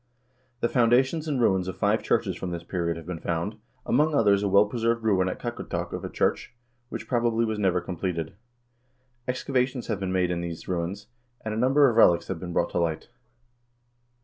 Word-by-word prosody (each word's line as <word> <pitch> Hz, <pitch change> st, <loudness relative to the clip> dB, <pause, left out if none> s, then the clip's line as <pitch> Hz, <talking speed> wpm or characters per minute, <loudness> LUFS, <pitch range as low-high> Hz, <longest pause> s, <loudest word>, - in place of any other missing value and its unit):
The -, -, +3 dB
foundations 130 Hz, +6 st, +2 dB
and 140 Hz, -4 st, 0 dB
ruins 95 Hz, -6 st, +2 dB
of 95 Hz, -, -5 dB
five -, -, +2 dB
churches -, -, 0 dB
from 95 Hz, -, -5 dB
this 85 Hz, -1 st, -5 dB
period 85 Hz, -1 st, -2 dB
have 80 Hz, -, -9 dB
been 90 Hz, -1 st, -5 dB
found, 85 Hz, +7 st, -2 dB, 0.3 s
among 150 Hz, 0 st, +2 dB
others 100 Hz, -5 st, +4 dB
a 100 Hz, -, 0 dB
well 100 Hz, +2 st, +5 dB
preserved 115 Hz, +1 st, -1 dB
ruin 95 Hz, -4 st, +2 dB
at -, -, -4 dB
Kakortok 120 Hz, -1 st, -4 dB
of -, -, -5 dB
a -, -, -4 dB
church, -, -, -1 dB, 0.3 s
which, -, -, -6 dB
probably, 115 Hz, -2 st, +1 dB
was 110 Hz, -1 st, -2 dB
never 95 Hz, -3 st, +2 dB
completed. 85 Hz, -2 st, -3 dB, 0.9 s
Ex 125 Hz, 0 st, -2 dB
cavations 130 Hz, -2 st, -1 dB
have 105 Hz, -3 st, -1 dB
been 95 Hz, -1 st, -2 dB
made 90 Hz, -1 st, +1 dB
in 85 Hz, -1 st, -2 dB
these 85 Hz, -1 st, -6 dB
ruins, 90 Hz, +3 st, -3 dB, 0.4 s
and 110 Hz, -, -2 dB
a -, -, -3 dB
number 135 Hz, +4 st, +5 dB
of 115 Hz, -3 st, 0 dB
relics 85 Hz, -6 st, +5 dB
have 95 Hz, -4 st, -3 dB
been 90 Hz, 0 st, -6 dB
brought 85 Hz, 0 st, 0 dB
to -, -, 0 dB
light. 85 Hz, +2 st, -2 dB
100 Hz, 200 wpm, -26 LUFS, 90-120 Hz, 0.9 s, well